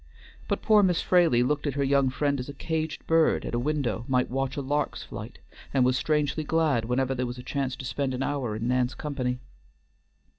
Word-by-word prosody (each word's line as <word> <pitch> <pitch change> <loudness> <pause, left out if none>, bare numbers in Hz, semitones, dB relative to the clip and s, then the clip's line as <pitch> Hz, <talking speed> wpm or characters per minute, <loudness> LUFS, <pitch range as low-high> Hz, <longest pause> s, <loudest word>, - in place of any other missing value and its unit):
But - - -2
poor 215 -1 +6
Miss 180 -3 +3
Fraley 170 -10 +4
looked 145 +3 0
at 140 - -2
her 140 - +1
young 140 -1 +3
friend 140 +1 0
as 125 - -5
a 140 - -7
caged 160 +1 -3
bird 165 -1 +3
at - - -5
a 120 - +1
window 125 -6 -1
might 125 -2 +1
watch 135 +1 -2
a - - -1
lark's 145 +2 -1
flight, - - -8 0.4
and 130 -2 +4
was 130 0 +3
strangely 150 +1 0
glad 150 -7 +1
whenever 130 +2 0
there 125 -1 -2
was 120 +1 -6
a 125 - -8
chance 135 -2 -2
to 130 - -8
spend 135 0 -2
an 130 - -2
hour 135 -7 -2
in 110 +2 -3
Nan's 125 0 +1
company. 130 -4 -2
135 Hz, 215 wpm, -27 LUFS, 125-150 Hz, 0.4 s, poor